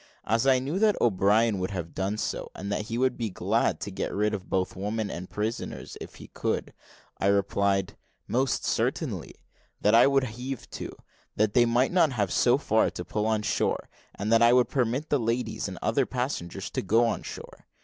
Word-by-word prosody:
As 115 Hz, +4 st, +1 dB
I 130 Hz, -1 st, +6 dB
knew 140 Hz, +8 st, -2 dB
that 215 Hz, -1 st, +3 dB
O'Brien 105 Hz, 0 st, +3 dB
would 90 Hz, -, -2 dB
have 90 Hz, -5 st, -5 dB
done 95 Hz, +3 st, -2 dB
so, -, -, -3 dB
and 100 Hz, +2 st, -5 dB
that 105 Hz, +1 st, -1 dB
he 115 Hz, -, -3 dB
would 130 Hz, 0 st, +1 dB
be 115 Hz, -2 st, -1 dB
glad 90 Hz, -, 0 dB
to 100 Hz, -, -4 dB
get 95 Hz, -, -3 dB
rid 105 Hz, +1 st, 0 dB
of 95 Hz, -3 st, -5 dB
both 95 Hz, -1 st, 0 dB
women 105 Hz, +2 st, -2 dB
and 90 Hz, +2 st, -6 dB
prisoners 110 Hz, +2 st, -4 dB
if -, -, -9 dB
he -, -, -12 dB
could, -, -, -2 dB, 0.5 s
I 95 Hz, -, +1 dB
replied, 100 Hz, 0 st, +1 dB, 0.3 s
"Most 130 Hz, +2 st, 0 dB
certainly;" -, -, -1 dB, 0.5 s
that 105 Hz, -, +3 dB
I 115 Hz, -, +7 dB
would 135 Hz, -1 st, +3 dB
heave 125 Hz, +2 st, -5 dB
to, -, -, -6 dB, 0.4 s
that 105 Hz, 0 st, +2 dB
they 120 Hz, -1 st, +5 dB
might 120 Hz, +3 st, +2 dB
not 170 Hz, -6 st, +3 dB
have 100 Hz, -6 st, 0 dB
so -, -, +4 dB
far -, -, +2 dB
to -, -, -7 dB
pull 105 Hz, 0 st, -1 dB
on 110 Hz, -1 st, +1 dB
shore, -, -, -1 dB, 0.3 s
and 105 Hz, +3 st, -1 dB
that 115 Hz, -, +5 dB
I 120 Hz, +1 st, +6 dB
would 125 Hz, -1 st, +4 dB
permit 130 Hz, +3 st, 0 dB
the 145 Hz, -, +3 dB
ladies 115 Hz, +2 st, -1 dB
and -, -, -7 dB
other -, -, +2 dB
passengers 100 Hz, -8 st, -3 dB
to -, -, -1 dB
go 115 Hz, +5 st, +3 dB
on 115 Hz, -, -1 dB
shore. -, -, -10 dB
110 Hz, 200 wpm, -27 LUFS, 100-125 Hz, 0.5 s, I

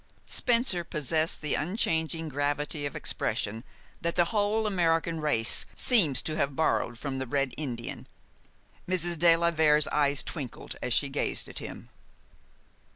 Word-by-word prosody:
Spencer 235 Hz, -7 st, +1 dB
possessed 160 Hz, 0 st, 0 dB
the 150 Hz, -2 st, -1 dB
unchanging 160 Hz, -2 st, -1 dB
gravity 145 Hz, +1 st, -1 dB
of 140 Hz, -, -9 dB
expression 110 Hz, +3 st, -2 dB, 0.4 s
that 170 Hz, 0 st, -1 dB
the 175 Hz, -, +4 dB
whole 215 Hz, +1 st, +1 dB
American 165 Hz, -4 st, +1 dB
race 115 Hz, -7 st, +1 dB
seems 170 Hz, -, +3 dB
to 155 Hz, -, -3 dB
have 140 Hz, -1 st, 0 dB
borrowed 120 Hz, -6 st, +1 dB
from 135 Hz, +1 st, -4 dB
the 130 Hz, -, -3 dB
Red 135 Hz, -1 st, 0 dB
Indian. 120 Hz, -6 st, -5 dB, 0.8 s
Mrs. 175 Hz, -2 st, +1 dB
de 170 Hz, 0 st, +7 dB
la 170 Hz, 0 st, +2 dB
Vere's 155 Hz, -2 st, +4 dB
eyes 140 Hz, -2 st, +2 dB
twinkled 135 Hz, -9 st, -6 dB
as -, -, -3 dB
she -, -, +3 dB
gazed -, -, 0 dB
at -, -, -1 dB
him. -, -, -8 dB
155 Hz, 145 wpm, -28 LUFS, 140-170 Hz, 0.8 s, de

